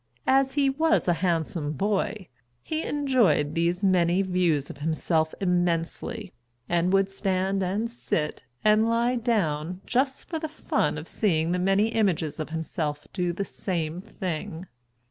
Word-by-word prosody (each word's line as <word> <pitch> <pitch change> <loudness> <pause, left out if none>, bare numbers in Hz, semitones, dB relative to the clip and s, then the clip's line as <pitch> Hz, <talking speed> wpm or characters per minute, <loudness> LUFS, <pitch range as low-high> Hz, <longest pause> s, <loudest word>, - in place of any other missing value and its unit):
As 270 0 +3
he 285 -1 +3
was 315 +1 +2
a 175 - +4
handsome 165 -4 0
boy, 200 +3 -1 0.4
he 315 0 -2
enjoyed 240 - +2
these 170 +3 0
many 180 -1 +3
views 175 -6 +1
of 140 - -13
himself 160 +1 0
immensely, 175 +2 -1 0.3
and 175 +1 +1
would 195 0 +4
stand 195 0 -1
and 195 +5 0
sit 165 -10 -3 0.2
and 215 +1 +4
lie 235 +2 +2
down 180 -8 0
just 265 +2 0
for 325 - -3
the 315 - -3
fun 310 - -1
of - - -7
seeing 165 -6 +1
the 180 - +1
many 195 +4 +3
images 185 -9 0
of 155 - -3
himself 160 -2 -3
do 180 -2 0
the 195 +3 -3
same 170 -4 -3
thing. 180 -4 -5
185 Hz, 145 wpm, -26 LUFS, 165-220 Hz, 0.4 s, a